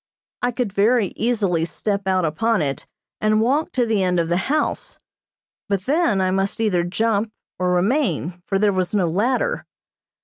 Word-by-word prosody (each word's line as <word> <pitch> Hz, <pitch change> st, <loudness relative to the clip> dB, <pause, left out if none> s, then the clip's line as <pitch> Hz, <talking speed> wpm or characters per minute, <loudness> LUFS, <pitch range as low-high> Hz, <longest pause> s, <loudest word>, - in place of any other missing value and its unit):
I 245 Hz, -, +1 dB
could 240 Hz, -5 st, -3 dB
very 210 Hz, 0 st, +3 dB
easily 205 Hz, -8 st, +1 dB
step 200 Hz, +3 st, -3 dB
out 185 Hz, -2 st, +2 dB
upon 210 Hz, +4 st, +1 dB
it, 140 Hz, -1 st, -4 dB, 0.3 s
and 215 Hz, 0 st, +2 dB
walk 280 Hz, +9 st, +1 dB
to 250 Hz, -2 st, +2 dB
the 220 Hz, -3 st, +1 dB
end 180 Hz, -1 st, +1 dB
of 165 Hz, -1 st, -1 dB
the 175 Hz, -, +2 dB
house, 305 Hz, +1 st, -1 dB, 0.7 s
but 200 Hz, -2 st, 0 dB
then 285 Hz, -, +2 dB
I 185 Hz, 0 st, +1 dB
must 195 Hz, +2 st, -1 dB
either 195 Hz, -6 st, +1 dB
jump 215 Hz, +4 st, 0 dB, 0.3 s
or 180 Hz, 0 st, +1 dB
remain, 180 Hz, -, 0 dB
for 195 Hz, -, +1 dB
there 205 Hz, 0 st, +2 dB
was 185 Hz, +2 st, -1 dB
no 185 Hz, -4 st, +2 dB
ladder. 250 Hz, -, 0 dB
200 Hz, 170 wpm, -21 LUFS, 180-230 Hz, 0.7 s, very